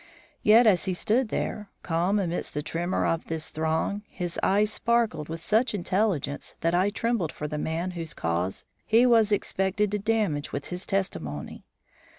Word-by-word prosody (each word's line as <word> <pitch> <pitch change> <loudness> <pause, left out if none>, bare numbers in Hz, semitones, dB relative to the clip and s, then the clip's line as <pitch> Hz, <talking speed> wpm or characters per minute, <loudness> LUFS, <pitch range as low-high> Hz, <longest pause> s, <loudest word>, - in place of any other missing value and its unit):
Yet 225 +3 +6
as 195 -5 +4
he 185 -2 -1
stood 225 +6 +1
there, 210 -1 -3
calm 175 +4 +1
amidst 175 -6 -2
the 150 - -2
tremor 175 +4 -1
of 165 0 0
this 160 -1 -3
throng, 160 +6 -1
his 175 -2 -4
eye 200 +2 +3
sparkled 225 -7 0
with 165 0 -5
such 220 +1 +2
intelligence 185 -7 -1
that 165 0 +1
I 185 +3 +3
trembled 220 -6 -1
for 150 - -5
the 150 0 -4
man 165 +4 -2
whose 165 -3 -5
cause 85 +3 -2 0.2
he 230 +3 +4
was 225 -3 +4
expected 195 0 0
to 210 - 0
damage 205 -9 0
with 140 - -5
his 180 +1 -4
testimony. 80 - -3
185 Hz, 165 wpm, -27 LUFS, 160-210 Hz, 0.2 s, Yet